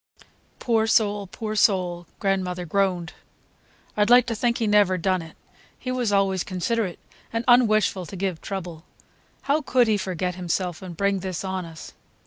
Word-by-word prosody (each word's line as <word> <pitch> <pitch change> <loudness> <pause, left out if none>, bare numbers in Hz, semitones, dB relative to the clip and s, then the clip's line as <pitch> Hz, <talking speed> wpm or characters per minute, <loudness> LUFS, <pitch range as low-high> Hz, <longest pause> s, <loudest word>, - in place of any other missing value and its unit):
"Poor 225 -2 +1
soul, 205 -3 +2
poor 215 +3 -5
soul!" 180 -5 +1
grandmother 185 -3 -1
groaned. 180 -1 0 0.8
"I'd 210 +1 +2
like 245 0 +7
to 235 -2 -2
think 235 +2 0
he 230 - -1
never 205 -3 +4
done 185 +1 0
it. 160 -1 -12 0.4
He 255 - -5
was 245 -4 0
always 195 -2 +2
considerate 185 +1 -2 0.3
and 230 +1 -2
un 245 -1 +6
wishful 200 -4 +1
to - - -8
give 185 -3 -3
trouble. 175 -5 -6 0.6
How 285 +3 +1
could 250 -4 +2
he 215 -1 +3
forget 185 -2 -2
himself 180 -1 -3
and 180 -3 -8
bring 200 0 +1
this 185 -1 -4
on 190 -1 -3
us!" 165 -1 -11
195 Hz, 165 wpm, -24 LUFS, 180-220 Hz, 0.8 s, like